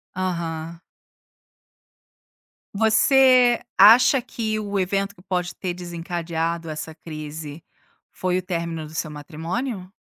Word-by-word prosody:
Aham. 170 -3 -3 1.9
Você 245 +3 +5 0.2
acha 240 +6 +7
que 220 -3 -3
o 205 -1 -2
evento 195 +2 -1
que 180 - -18
pode 180 -2 -3
ter 185 -2 -3
desencadeado 170 -1 -4
essa 155 +1 -6
crise 155 -1 -8 0.5
foi 185 -1 -1
o - - -1
término 170 -3 -4
do 150 - -12
seu 155 - -2
matrimônio? 180 - -5
180 Hz, 110 wpm, -23 LUFS, 165-205 Hz, 1.9 s, acha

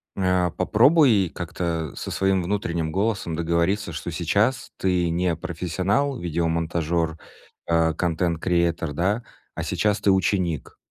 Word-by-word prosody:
Э, 90 -2 +2
попробуй 130 - +4
как-то 85 -2 -3
со - - -5
своим 95 -1 +1
внутренним 85 -4 -2
голосом 95 -3 -1
договориться, 85 +5 0
что - - -5
сейчас 100 +10 0
ты 90 -2 +1
не 85 0 0
профессионал, 95 - -1
видеомонтажер, 85 -1 -1 0.5
э, 80 -1 +3
content 85 0 -1
creater, 85 -3 +1
да, 100 +9 0 0.3
а - - -3
сейчас 105 -1 0
ты 100 - +4
ученик. 90 -3 0
85 Hz, 120 wpm, -24 LUFS, 85-95 Hz, 0.5 s, попробуй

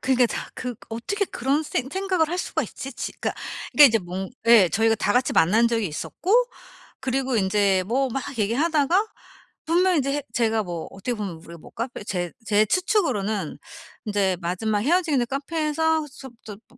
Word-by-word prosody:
그니까 255 -2 +3
다 - - -5
그 250 -2 -5 0.2
어떻게 400 - -2
그런 275 +5 0
생 265 -3 -3
생각을 375 -4 0
할 355 - -2
수가 - - -1
있지? 270 0 -7
지 - - -5
그러니까 - - -1 0.4
그러니까 295 - +9
이제 225 -1 +2
뭔 185 +1 -6 0.2
예 220 -6 +7
저희가 225 +6 +2
다 205 - 0
같이 250 +1 +2
만난 215 +8 +4
적이 225 -3 0
있었고 310 - -4 0.7
그리고 265 -1 -1
인제 195 -1 +2
뭐 265 +4 +1
막 270 - -2 0.2
얘기하다가 305 - +2 0.6
분명히 350 0 +3
이제 275 +1 -1
해 290 - -4
제가 225 -2 +1
뭐 170 -3 -5
어떻게 195 +6 -4
보면 200 -5 -4
우리가 170 +1 -12
뭐 - - -14
카페 235 -1 -5
제 175 -4 -3
제 215 0 +3
추측으로는 220 - 0 0.5
인제 195 -3 +1
마지막 205 +5 -1
헤어지는 305 - +2
카페에서 310 +2 0
숩 265 -2 -12
뜻 210 -1 -9
쁘 245 - -23
240 Hz, 360 characters per minute, -24 LUFS, 205-300 Hz, 0.7 s, 그러니까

